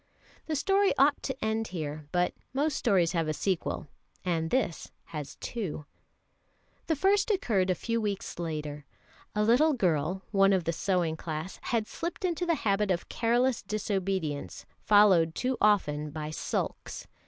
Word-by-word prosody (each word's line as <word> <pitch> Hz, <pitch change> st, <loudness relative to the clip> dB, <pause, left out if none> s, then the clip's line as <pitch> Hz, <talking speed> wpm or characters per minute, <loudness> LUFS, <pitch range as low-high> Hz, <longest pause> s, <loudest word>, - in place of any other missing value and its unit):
The 315 Hz, -, -1 dB
story 390 Hz, +7 st, +2 dB
ought 285 Hz, +2 st, +4 dB
to 265 Hz, -4 st, -4 dB
end 220 Hz, 0 st, 0 dB
here; 155 Hz, -4 st, -5 dB
but 180 Hz, 0 st, +1 dB, 0.2 s
most 285 Hz, +2 st, +1 dB
stories 185 Hz, -8 st, +2 dB
have 165 Hz, -2 st, 0 dB
a 155 Hz, -, -1 dB
sequel, 180 Hz, -4 st, -2 dB, 0.4 s
and 165 Hz, -2 st, 0 dB
this 250 Hz, -9 st, -1 dB
has 150 Hz, -4 st, -7 dB
two. 185 Hz, -10 st, -5 dB, 1.0 s
The 320 Hz, -, +2 dB
first 390 Hz, +7 st, +3 dB
occurred 220 Hz, -, +1 dB
a 185 Hz, -, +3 dB
few 230 Hz, +6 st, -1 dB
weeks 200 Hz, -4 st, -3 dB
later. 150 Hz, -3 st, -4 dB, 0.5 s
A 210 Hz, -, +2 dB
little 260 Hz, +8 st, +4 dB
girl, 180 Hz, -, 0 dB
one 195 Hz, -1 st, +5 dB
of 185 Hz, -2 st, +2 dB
the 165 Hz, -, -1 dB
sewing 175 Hz, -3 st, 0 dB
class, 160 Hz, +3 st, -5 dB
had 230 Hz, -3 st, 0 dB
slipped 340 Hz, -, -4 dB
into 350 Hz, 0 st, -1 dB
the 335 Hz, -, +3 dB
habit 200 Hz, 0 st, +2 dB
of 175 Hz, -2 st, -1 dB
careless 240 Hz, +2 st, +1 dB
disobedience, 195 Hz, -7 st, -2 dB
followed 190 Hz, -6 st, +5 dB
too 255 Hz, +1 st, 0 dB
often 150 Hz, -8 st, +2 dB
by 155 Hz, 0 st, -5 dB
sulks. -, -, -3 dB
195 Hz, 155 wpm, -29 LUFS, 165-240 Hz, 1.0 s, one